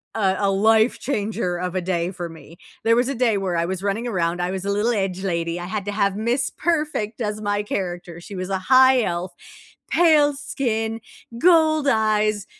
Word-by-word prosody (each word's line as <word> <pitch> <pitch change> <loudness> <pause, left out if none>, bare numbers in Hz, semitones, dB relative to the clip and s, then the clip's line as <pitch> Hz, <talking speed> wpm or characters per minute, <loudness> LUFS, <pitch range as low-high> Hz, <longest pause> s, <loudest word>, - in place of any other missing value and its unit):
a 190 -3 +1
a 200 -1 +2
life 220 +4 +3
changer 205 -8 -2
of 180 +1 -4
a 185 - 0
day 175 0 -1
for 175 -2 -6
me. 165 0 -13 0.3
There 230 0 +5
was 245 +2 +1
a - - -1
day 230 -4 +2
where 185 -3 -2
I 170 - +1
was 185 +1 -4
running 210 +4 -1
around, 175 -5 -1
I 180 +1 -1
was 190 0 -4
a 200 - 0
little 215 +4 +1
edge 190 -3 -2
lady, 170 -2 -2
I 175 - -5
had 200 +1 -4
to 205 - -3
have 200 -1 0
miss 235 +4 0
perfect 300 -10 -2
as 210 -1 -2
my 205 0 0
character, 175 -4 -5
she 200 - -9
was 185 +1 -4
a 195 - 0
high 260 +5 +5
elf, 175 -1 -3 0.6
pale 305 -4 +4
skin, 225 -5 -2 0.4
gold 315 -2 +4
eyes, 215 -3 +1
205 Hz, 200 wpm, -22 LUFS, 185-235 Hz, 0.6 s, There